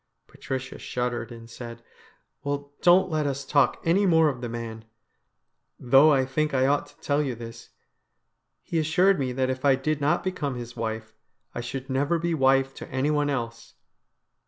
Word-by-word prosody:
Patricia 130 0 -6
shuddered 120 -1 -3
and 115 -1 -10
said: 115 0 -9 0.3
' - - -40
Well, 145 0 -4
don't 180 +1 +5
let 155 -2 0
us 140 0 -3
talk 140 0 +2
any 190 +5 +3
more 160 -3 +5
of 125 -4 -5
the 120 - -4
man. 115 -1 -6 0.9
Though 135 +5 +6
I 135 -2 +3
t 135 +4 -1
hink 155 -2 0
I 130 0 +3
ought 140 +1 +1
to - - -21
tell 145 +1 +1
you 135 -5 -2
this, 115 0 -10 0.9
he 165 - -1
assured 180 +4 +3
me 130 -2 -1
that 130 0 0
if 130 0 -5
I 140 -2 +5
did 145 +2 -2
not 145 +2 +2
become 150 -8 -2
his 120 -1 -7
wife, 110 -1 -4 0.4
I - - -4
should 130 +2 -6
never 140 +5 +1
be 170 +1 -1
wife 135 -2 +3
to - - -8
anyone 145 +2 +1
else.' 115 -4 -4
135 Hz, 180 wpm, -26 LUFS, 120-150 Hz, 0.9 s, Though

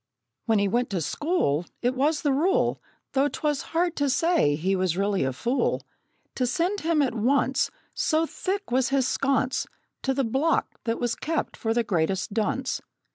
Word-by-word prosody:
When 225 -1 +4
he 200 0 +2
went 240 +5 0
to 190 - -1
school, 175 - 0 0.2
It 245 +1 +2
was 290 +4 +1
the 290 - +3
rule 335 +8 +2 0.3
(Though 275 +1 +3
'twas 295 0 -1
hard 345 +1 0
to 285 -1 +1
say 285 - +3
he 185 +6 0
was 185 -2 0
really 200 -2 +1
a 135 - 0
fool) 235 - 0 0.5
To 250 - 0
send 350 +11 0
him 320 -3 +2
at 255 - 0
once, 260 +4 +2 0.2
So 315 +1 +1
thick 390 +1 -3
was 255 0 +2
his 270 -2 +2
sconce, 270 -2 0 0.3
To 265 0 0
the 275 - +1
block 270 +8 0
that 230 0 -1
was 240 -1 0
kept 320 +5 -2
for 225 - -2
the 235 +1 +2
greatest 190 -1 0
dunce. 230 +4 -1
260 Hz, 180 wpm, -26 LUFS, 215-300 Hz, 0.5 s, When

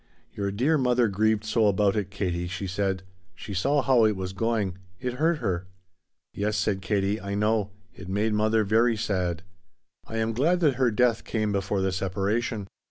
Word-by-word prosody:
"Your 100 -1 -2
dear 140 +10 +2
mother 125 -2 +3
grieved 110 +1 +1
so 110 0 +2
about 100 0 +2
it, 100 -3 -1
Katie," 90 -3 -2
she 95 +2 -4
said. 95 0 -1 0.3
"She 100 - -8
saw 135 +9 +1
how 130 -4 +4
it 105 -1 +2
was 95 0 -4
going. 100 -3 -1 0.2
It 125 -1 -3
hurt 165 +1 +3
her." 95 -8 -2 0.7
"Yes," 105 +1 -1
said 95 -2 0
Katie, 100 +1 0
"I 100 0 -4
know. 105 0 +1 0.2
It 90 0 -10
made 105 +3 0
mother 110 +1 +2
very 110 +3 +3
sad." 90 -6 -1 0.6
"I 115 - -5
am 115 0 0
glad 160 +10 +2
that 145 -6 +3
her 125 - +5
death 115 +1 +2
came 110 -2 -1
before 100 0 -1
the 95 0 +1
separation." 100 +4 -1
105 Hz, 180 wpm, -26 LUFS, 95-115 Hz, 0.7 s, her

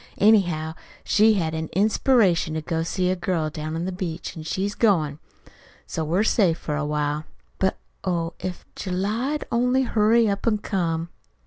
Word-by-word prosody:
"Anyhow, 175 -7 +3 0.3
she's 215 0 +4
had 165 -3 -1
an 160 0 -3
inspiration 200 -4 +3
to 160 - -1
go 165 +1 -2
see 180 +2 0
a - - +1
girl 175 -4 -1
down 155 0 -5
to 165 - -2
the 185 +2 -2
beach, 180 -3 -5
an' 160 - -7
she's 190 +6 -2
goin'. 160 -11 +2 0.7
So 160 - -3
we're 170 +7 +1
safe 190 -7 +3
for 150 - -3
a 150 0 -1
while. 150 0 -1 0.3
But, 190 0 +1 0.3
oh, 170 -2 -1
if 185 -1 -5
July'd 215 +11 -2
only 250 +3 +2
hurry 225 -1 +3
up 200 +2 -1
an' 215 -2 +3
come!" 170 -5 -2
180 Hz, 165 wpm, -24 LUFS, 160-210 Hz, 0.7 s, she's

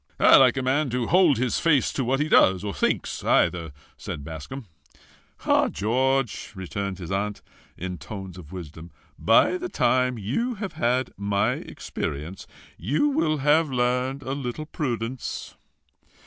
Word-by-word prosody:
"I - - +7
like 130 0 +5
a 130 - -1
man 135 +3 +1
to 125 0 -1
hold 170 -1 +4
his 125 0 0
face 150 -5 +2
to 135 - -1
what 130 +3 0
he 150 - +1
does, 95 - +4
or 100 -1 -3
thinks - - -1
either," 85 -3 +2 0.3
said 70 - -6
Bascombe. 80 - -7 0.8
"Ah, - - +4
George!" 130 +2 0
returned 95 +1 -4
his 85 -2 -7
aunt, 100 +1 -2 0.3
in 90 -1 -5
tones 95 +2 -8
of 85 -5 -12
wisdom, 85 -2 -9 0.3
"by 115 - +4
the 360 0 -4
time 125 - +1
you 185 - -2
have 200 -2 -5
had 130 -2 0
my 100 +2 +1
experience, 80 - -6 0.3
you 145 - +1
will 275 - +1
have 155 +1 +4
learned 125 +2 0
a 130 - -4
little 140 +2 -4
prudence." 125 -5 -4
125 Hz, 150 wpm, -25 LUFS, 95-135 Hz, 0.8 s, I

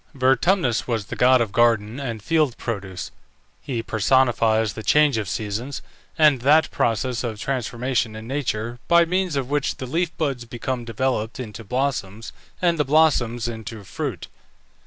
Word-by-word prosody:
Vertumnus 130 - +2
was 115 -4 -1
the - - -6
god 130 0 +5
of 110 -4 -1
garden 115 +1 +2
and 115 -6 -5
field 155 -7 +1
produce. 95 -5 -5 0.5
He 120 -4 -3
personifies 110 -2 +2
the 110 - -7
change 145 0 +3
of 105 -4 -4
seasons, 110 +7 -4 0.3
and 150 -6 +5
that 150 +5 +4
process 120 +2 0
of 115 -3 -3
transformation 125 -3 -2
in 110 0 -8
nature 120 -4 -3
by 170 0 +5
means 180 -1 -1
of 135 -1 -2
which 145 -2 0
the 130 - -5
leaf 165 +7 0
buds 135 -6 -1
become 120 +1 -4
developed 115 0 -2
into 110 -3 -7
blossoms, 115 -3 -3 0.3
and 170 -3 +1
the - - +4
blossoms 130 -6 +2
into 110 -2 -7
fruit. - - -5
120 Hz, 155 wpm, -23 LUFS, 110-140 Hz, 0.5 s, god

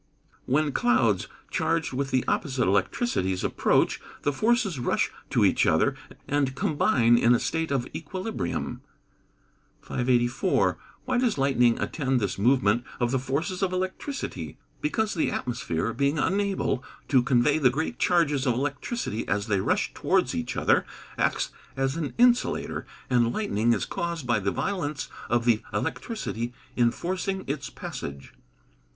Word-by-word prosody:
_ - - -40 0.4
When 150 +3 +2
clouds, 115 -6 +2 0.2
charged - - 0
with 135 +1 -1
the 130 -2 +1
opposite 130 -4 0
electricities 95 - 0
approach, - - +2 0.2
the 145 - +1
forces 215 - +1
rush 120 - 0 0.2
to - - +3
each - - +3
other, - - +3 0.3
and 140 -2 0
combine 120 -5 +3
in 120 +1 +5
a - - +1
state 160 0 -1
of 135 -3 0
equilibrium. 175 - -4 1.0
584. 125 +6 +1 0.3
Why 255 -1 +1
does 245 - +1
lightning 125 -4 +3
attend 135 -4 0
this 100 -3 -2
movement 120 -1 +3 0.2
of 120 -1 +1
the 130 - +1
forces 155 +9 -2
of 190 -2 +1
electricity? 185 +10 -4 0.2
Because 220 -8 0
the 165 - +1
atmosphere, 115 -4 -2
being 140 +4 +1
unable 195 -6 0 0.3
to 130 -3 +5
convey 130 +4 +3
the 130 -4 +5
great 135 -1 -3
charges 150 -6 +2
of 120 - +3
electricity 140 - -3
as 100 0 0
they 100 -3 +1
rush - - 0
towards - - +1
each 80 - -3
other, - - +3 0.3
acts - - 0 0.3
as 135 +1 0
an 160 -4 -3
insulator, 245 0 +2 0.2
and 120 -2 +3
lightning 120 - +1
is - - +1
caused 170 -4 -3
by 120 -3 +2
the 100 0 0
violence 155 - -2 0.2
of 120 0 +1
the 115 -3 +3
electricity 120 - -3 0.2
in 120 -1 +4
forcing 190 +6 -3
its 140 0 -3
passage. 70 -1 -7
135 Hz, 145 wpm, -26 LUFS, 120-170 Hz, 1.0 s, in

